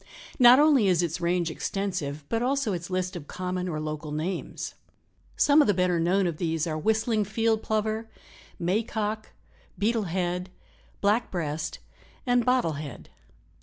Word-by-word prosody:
Not 245 Hz, 0 st, +9 dB
only 285 Hz, -7 st, +5 dB
is 180 Hz, -2 st, +3 dB
its 170 Hz, 0 st, -2 dB
range 170 Hz, -1 st, +1 dB
extensive, 160 Hz, -6 st, -3 dB
but 230 Hz, +6 st, -1 dB
also 260 Hz, -3 st, +1 dB
its 175 Hz, 0 st, -5 dB
list 185 Hz, 0 st, -2 dB
of 155 Hz, -4 st, -7 dB
common 180 Hz, 0 st, -3 dB
or 155 Hz, -2 st, -3 dB
local 155 Hz, 0 st, -5 dB
names. 160 Hz, +5 st, -4 dB, 0.6 s
Some 295 Hz, +1 st, +6 dB
of -, -, +3 dB
the 205 Hz, -, +3 dB
better 180 Hz, -1 st, +2 dB
known 185 Hz, +4 st, +2 dB
of 170 Hz, -3 st, -2 dB
these 160 Hz, -2 st, -1 dB
are 160 Hz, -2 st, -2 dB
Whistling 220 Hz, +6 st, +1 dB
Field 220 Hz, +2 st, 0 dB
Plover, 220 Hz, +1 st, -1 dB, 0.5 s
May 180 Hz, +6 st, +1 dB
Cock, 215 Hz, -1 st, -3 dB, 0.5 s
Beetle 220 Hz, 0 st, +1 dB
head, 180 Hz, +1 st, -2 dB, 0.5 s
Black 210 Hz, +4 st, +2 dB
breast 160 Hz, -3 st, -3 dB, 0.5 s
and 245 Hz, -1 st, +3 dB
Bottle 245 Hz, -, +1 dB
head. 140 Hz, -6 st, -9 dB
185 Hz, 155 wpm, -27 LUFS, 170-220 Hz, 0.6 s, Not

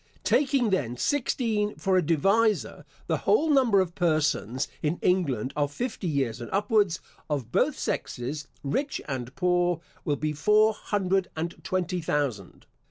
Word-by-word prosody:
Taking, 265 Hz, -6 st, +2 dB
then, 125 Hz, -10 st, 0 dB
sixteen 225 Hz, -, 0 dB
for 190 Hz, -1 st, 0 dB
a 185 Hz, -, +5 dB
divisor, 195 Hz, +7 st, +1 dB, 0.2 s
the -, -, 0 dB
whole 320 Hz, -7 st, +3 dB
number 250 Hz, -8 st, +4 dB
of 180 Hz, -2 st, 0 dB
persons 155 Hz, -, 0 dB
in 155 Hz, +3 st, 0 dB
England 140 Hz, -, +1 dB
of 145 Hz, -1 st, 0 dB
fifty 220 Hz, -, -4 dB
years 135 Hz, -6 st, -1 dB
and 120 Hz, -, -6 dB
upwards, 205 Hz, -3 st, +2 dB, 0.3 s
of 140 Hz, -6 st, -2 dB
both -, -, +2 dB
sexes, 140 Hz, +5 st, -3 dB, 0.2 s
rich 270 Hz, -, -1 dB
and 130 Hz, -1 st, -5 dB
poor, 180 Hz, -2 st, +2 dB, 0.2 s
will 145 Hz, -, 0 dB
be 155 Hz, +1 st, -2 dB
four 210 Hz, +8 st, +4 dB
hundred 195 Hz, -3 st, -1 dB
and 165 Hz, +2 st, -3 dB
twenty 180 Hz, -1 st, -1 dB
thousand. 140 Hz, -, -2 dB
175 Hz, 145 wpm, -27 LUFS, 145-210 Hz, 0.3 s, a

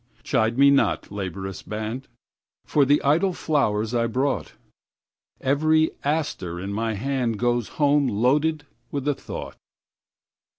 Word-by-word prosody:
Chide 110 Hz, +2 st, +1 dB
me 140 Hz, +1 st, +7 dB
not, 140 Hz, -, +1 dB
laborious 95 Hz, -1 st, -5 dB
band, 110 Hz, +5 st, -5 dB, 0.6 s
For 145 Hz, -2 st, +3 dB
the 145 Hz, +2 st, +3 dB
idle 165 Hz, +7 st, +3 dB
flowers 110 Hz, -10 st, 0 dB
I 115 Hz, -1 st, +2 dB
brought; 130 Hz, +5 st, -1 dB, 0.9 s
Every 155 Hz, +4 st, +2 dB
aster 140 Hz, -, -2 dB
in 100 Hz, +2 st, -4 dB
my 110 Hz, +1 st, -1 dB
handGoes 120 Hz, -1 st, 0 dB
home 145 Hz, -1 st, +3 dB
loaded 145 Hz, +7 st, +1 dB, 0.2 s
with 140 Hz, -1 st, -4 dB
a 145 Hz, -, +3 dB
thought. -, -, -8 dB
130 Hz, 120 wpm, -24 LUFS, 110-145 Hz, 0.9 s, me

